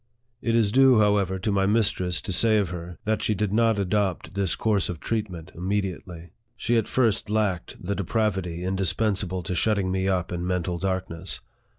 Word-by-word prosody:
It 115 -1 0
is 110 -3 +3
due, 130 0 +6
however, 100 -3 +2
to 105 +3 -2
my 100 -1 +2
mistress 100 -4 +1
to 95 - -2
say 110 +3 +5
of 100 -4 0
her, 90 -1 -7
that 110 0 0
she 105 - +1
did 105 -1 -1
not 115 -1 +3
adopt 100 -1 -1
this 100 -3 +1
course 105 -4 +1
of 85 - -5
treatment 95 -6 -4
immediately. 90 -2 -4 0.2
She 115 +1 0
at 115 -3 +1
first 110 -4 +1
lacked 105 -5 -1
the 95 +3 -3
depravity 95 -3 -1
indispensable 95 0 0
to 90 - -3
shut 105 +5 +2
ting 95 -2 -1
me 95 0 0
up 95 -1 0
in 90 -1 -3
mental 90 -1 -1
darkness. 95 -2 -3
95 Hz, 185 wpm, -25 LUFS, 90-105 Hz, 0.2 s, due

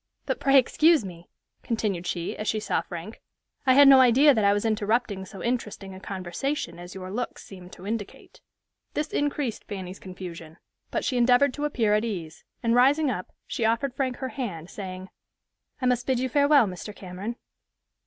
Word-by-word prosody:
But, - - -2
pray 275 0 +5
excuse 305 +1 +4
me," 175 -2 -10 0.3
continued 205 -6 -2
she, 170 -1 -3
as 215 - -5
she 215 - +1
saw - - 0
Frank, 175 +5 -8 0.5
"I 260 - +6
had 285 0 +8
no 270 -1 +9
idea 265 +4 +6
that 220 -4 +1
I 200 - +5
was 205 +2 0
interrupting 215 -2 0
so 190 0 -9
interesting 215 -5 -3
a 190 - -9
conversation 190 - -4
as 175 +1 -10
your 185 -1 -7
looks 245 +5 -4
seem 185 -2 -12
to 185 - -12
indicate." 210 -1 -6 0.5
This 300 0 -1
increased 285 -5 -1
Fanny's 190 -2 -7
confusion, 170 -3 -9 0.3
but - - -2
she 255 - 0
endeavored 250 +3 +4
to 295 +2 -3
appear 230 -8 +1
at 210 +1 +2
ease; 170 -8 -5 0.2
and 230 0 +2
rising 275 +4 +4
up, 180 -6 -5
she - - -3
offered 230 +4 +1
Frank 260 -2 -1
her 260 - -4
hand, 195 - -5
saying, 185 -1 -7 0.7
"I 255 - -2
must 250 -1 +1
bid 260 -2 +2
you 260 +1 -1
farewell, 285 -1 +5
Mr. 195 +2 -7
Cameron." 190 +5 -6
220 Hz, 185 wpm, -26 LUFS, 185-255 Hz, 0.7 s, no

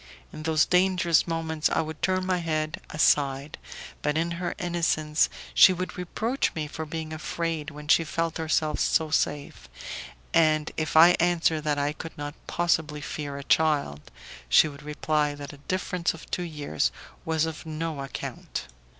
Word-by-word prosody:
In - - -7
those 155 -1 +3
dangerous 180 -3 +3
moments 160 -2 -1
I - - +1
would 160 0 -7
turn 185 0 +1
my 185 -1 +1
head 155 -2 -2
aside; 145 -2 +1 0.4
but 150 +1 0
in 170 +1 0
her 175 - -2
innocence 165 -3 +1 0.2
she 185 - +8
would 185 +1 -4
reproach 220 +8 -1
me 155 -2 -2
for 155 +1 -6
being 160 0 -5
afraid 160 -1 -3
when 150 0 -10
she 165 - +5
felt 165 +1 -2
herself 155 -1 0
so 160 -2 +2
safe, 140 - -1 0.6
and 155 -1 +3
if 155 0 -1
I 165 +2 +10
answered 165 -3 +2
that 150 -1 +1
I 145 +1 0
could 165 +1 -9
not 145 0 -5
possibly 160 -3 0
fear 145 -1 -5
a 140 - -6
child, 145 - +1 0.4
she - - +6
would 140 -1 -9
reply 150 0 0
that 145 +1 -8
a - - -11
difference 180 +2 -2
of 165 - -13
two - - -1
years 150 - -1 0.3
was 160 -1 +1
of 160 0 -6
no 155 -1 -3
account. 135 -1 -6
155 Hz, 165 wpm, -27 LUFS, 150-165 Hz, 0.6 s, I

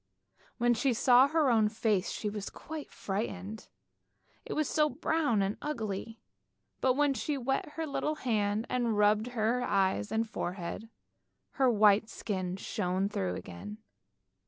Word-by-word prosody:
When 240 0 +3
she 250 +1 +1
saw 250 +2 +6
her 305 -3 +2
own 220 -2 +4
face 215 -3 0
she 215 - -3
was 205 -1 -4
quite 310 -1 -8
frightened, 200 +1 -4 0.8
it - - -3
was 305 -2 0
so 300 -1 +2
brown 295 - +1
and 195 +1 -2
ugly, 225 -6 -4 0.6
but 255 -1 +2
when 290 0 +3
she 280 +4 -2
wet 270 +3 -2
her 325 - -3
little 305 +1 -1
hand 215 -5 0
and 240 -4 0
rubbed 210 +2 +3
her 225 +3 +1
eyes 195 -3 +1
and 225 +1 0
forehead, 185 +2 -5 0.6
her 265 -2 +3
white 215 -1 +4
skin 185 -4 -3
shone 190 0 -1
through 90 - -2
again. 95 +5 -8
220 Hz, 145 wpm, -31 LUFS, 200-260 Hz, 0.8 s, saw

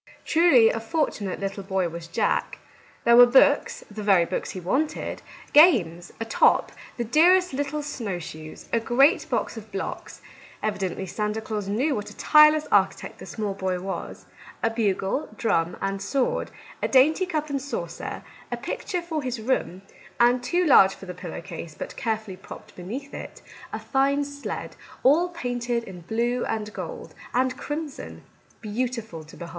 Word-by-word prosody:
Truly 315 -9 +5
a 225 - -3
fortu 295 +1 -1
nate 190 -2 -3
little 195 0 -4
boy 190 -2 -1
was 170 0 -7
Jack! 165 - 0 0.5
There 235 0 +6
were 245 0 +10
books 255 +2 +4
— - - -21
the - - -3
very 195 -4 +4
books - - -3
he 185 - -5
wanted, 265 - -2 0.2
— - - -20
games, 195 - +5
a 225 - -3
top, 225 - +3 0.3
the 240 - -1
dearest 350 +8 +4
little 285 +2 -2
snow 230 -10 -4
shoes, 155 -2 -9
a 230 - +4
great 270 - +3
box - - -1
of 220 -1 -10
blocks, 195 -1 -5 0.2
— - - -21
evidently 195 -3 -2
Santa 210 +3 -2
Claus 215 -2 -4
knew 250 +9 +1
what 210 -4 -4
a - - -14
tireless 305 0 +6
architect - - +1
this - - -9
small 210 -3 -3
boy 190 -2 -2
was, 190 +1 -6 0.2
— - - -19
a 230 - +2
bugle, 210 +3 -1
drum, 170 -7 0
and 195 0 -2
sword, 255 +6 -1 0.3
a - - +1
dainty 310 +8 +4
cup 305 -4 -2
and 275 -1 -1
saucer, 280 +1 -5 0.3
a - - -2
picture 360 -3 -4
for 320 -3 -3
his 255 -3 -3
room, 215 -5 -1 0.4
and, 245 +1 +4
too 350 +8 +1
large 195 - +6
for - - -12
the 180 - -6
pillow 175 -2 -7
case, 170 -3 -8
but - - -6
carefully 220 -5 -3
propped - - -12
beneath 245 +11 -7
it, - - -9 0.3
a - - -3
fine 280 +1 +1
sled, 285 0 -6 0.3
all 325 +7 +4
painted 245 -7 -2
in 185 -5 -10
blue 235 +6 -1
and 215 -1 -3
gold - - -7 0.2
and 255 0 +2
crimson, 295 -1 -6 0.4
beautiful 225 -5 -3
to 155 - -14
behold 170 -1 -8
230 Hz, 175 wpm, -25 LUFS, 195-280 Hz, 0.5 s, were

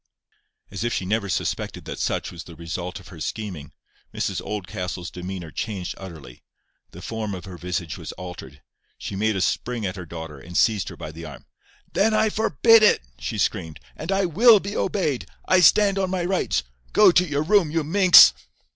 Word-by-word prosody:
As - - -4
if 120 - -1
she - - -2
had - - -6
never 105 -2 0
suspected - - -3
that - - -6
such - - -2
was 85 -1 -9
the 85 - -12
result 85 +4 -6
of 90 - -15
her 85 - -12
scheming, 85 -4 -5 0.4
Mrs - - -3
Oldcastle's 90 -3 -5
demeanour 90 -2 -7
changed 100 -4 -4
utterly. 80 -10 -11 0.5
The 90 - -12
form 110 -3 -4
of 90 - -9
her 95 -2 -9
visage 90 -2 -4
was - - -7
altered. 90 -6 -10 0.3
She - - -6
made 110 +2 0
a 95 - -1
spring 120 +2 -1
at 95 +1 -4
her 90 -2 -8
daughter, 80 -3 -8
and 85 +5 -6
seized 105 -7 +2
her - - -11
by 75 - -7
the 80 +1 -9
arm. 70 -5 -11 0.5
"Then 215 +3 +2
I 215 0 +3
forbid 225 - +4
it," 210 - +4 0.2
she - - -4
screamed; 80 -1 -2 0.2
"and - - -5
I 195 0 +2
WILL 215 +6 +6
be 200 +2 -6
obeyed. 170 -10 -1 0.2
I 185 - +5
stand 200 +2 +5
on 190 -1 0
my 180 -2 -1
rights. 185 - 0 0.3
Go - - +7
to 180 - +4
your 150 -4 -1
room, 190 -1 +3
you 160 +1 -1
minx." 185 +3 +8
100 Hz, 195 wpm, -23 LUFS, -, 0.5 s, minx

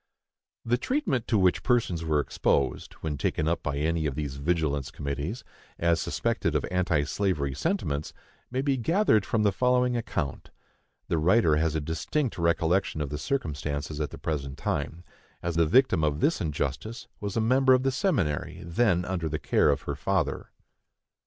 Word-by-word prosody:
The 120 +1 +1
treatment 255 - -1
to 110 - +2
which 95 -2 +3
persons 110 -10 +1
were 80 -2 +1
exposed, 70 -1 0
when 75 -3 -3
taken 75 - 0
up 85 +1 0
by 70 -1 -2
any 80 +1 0
of 70 - -3
these 70 -2 -4
vigilance 70 -3 0
committees, 70 - -4 0.3
as 85 -2 +2
suspected - - -1
of - - +1
anti 90 -5 +1
slavery 75 -5 -1
sentiments, 75 - -2 0.4
may 130 +2 -1
be 140 -2 +1
gathered 125 - +2
from 110 -2 +1
the 105 - +4
following 125 +2 +2
account. 75 - -3 0.6
The 85 - 0
writer 85 -2 +4
has 80 0 +1
a - - +1
distinct 90 - -2
recollection 85 +1 +1
of 75 -2 -2
the 75 - -3
circumstances 75 - -3
at 75 - -1
the - - -9
present 70 -4 -3
time, 80 +4 -3 0.4
as 85 - -1
the 85 -1 +3
victim 130 - +4
of 75 -1 +1
this 155 - +2
injustice 75 - -3
was 100 +1 -4
a - - +3
member 130 +3 +4
of 130 - 0
the 135 - +2
seminary 130 - -1
then 90 0 +2
under 90 -3 -2
the 75 - -2
care - - +2
of - - +1
her - - -3
father. - - -1
85 Hz, 170 wpm, -27 LUFS, 75-115 Hz, 0.6 s, the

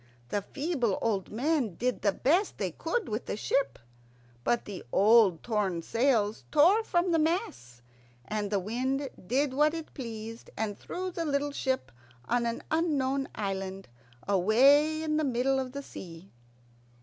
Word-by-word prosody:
The 205 - 0
feeble 270 - -1
old 205 -5 -1
men 250 - 0
did 250 +4 -1
the 200 - +3
best 345 - +1
they - - -2
could 485 -4 -2
with 215 +2 -4
the - - -3
ship; 275 +5 0 0.7
but 240 - +1
the 200 -3 -7
old, 205 -4 +5
torn 200 -7 -1
sails 230 -3 +1
tore 355 +9 +5
from 350 -3 +1
the 330 - +3
masts, 315 - -2 0.4
and 210 +3 -2
the 205 - +1
wind 255 +8 -1 0.2
did 265 +4 +1
what 300 +3 +3
it 325 -1 -7
pleased, 230 -3 -7
and 215 -2 -2
threw 370 - -5
the 340 -1 -3
little 290 -1 0
ship 260 - -2 0.4
on 240 0 +1
an 230 - -3
unknown 280 -4 +1
island 195 - -4 0.4
away 275 - +4
in 305 -1 0
the 310 - +1
middle 265 0 +1
of 260 -1 -3
the 280 +1 -6
sea. 175 -5 -10
250 Hz, 155 wpm, -29 LUFS, 210-300 Hz, 0.7 s, old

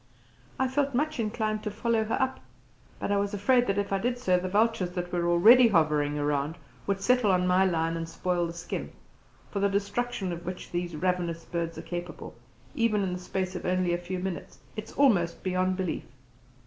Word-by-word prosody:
I 265 - +2
felt 275 0 0
much 305 +1 0
inclined 215 -1 -1
to 215 - -3
follow 220 +1 0
her 225 - -1
up, 265 -1 0 0.6
but - - -3
I 200 - +3
was 200 +1 -1
afraid 245 +5 +3
that 195 - 0
if 200 -1 -1
I 195 - +2
did 245 +4 -1
so 185 -7 +2
the 185 +1 -3
vultures 210 -2 +2
that 175 -1 -4
were 175 -1 +1
already 230 +9 +7
hovering 150 -6 +2
around 145 +1 0 0.3
would 195 -1 0
settle 250 0 +3
on 180 -1 +2
my 185 +1 +4
lion 165 -2 0
and 165 0 -4
spoil 175 0 -1
the 165 - -6
skin, 170 -1 -5 0.6
for 200 - -2
the 200 0 +2
destruction 200 +1 -1
of 170 0 -7
which 180 +1 -6
these 175 -1 -3
ravenous 175 -1 -1
birds 170 -1 -3
are - - -6
capable, 175 0 -6 0.4
even 215 -3 +1
in 185 -2 -1
the 180 - -4
space 185 0 -3
of - - -5
only 180 -1 +1
a - - +1
few 180 +1 -4
minutes, 180 -1 -5 0.2
is 215 0 -6
almost 185 -12 +2
beyond 185 0 0
belief. 185 -3 -2
185 Hz, 200 wpm, -28 LUFS, 175-215 Hz, 0.6 s, already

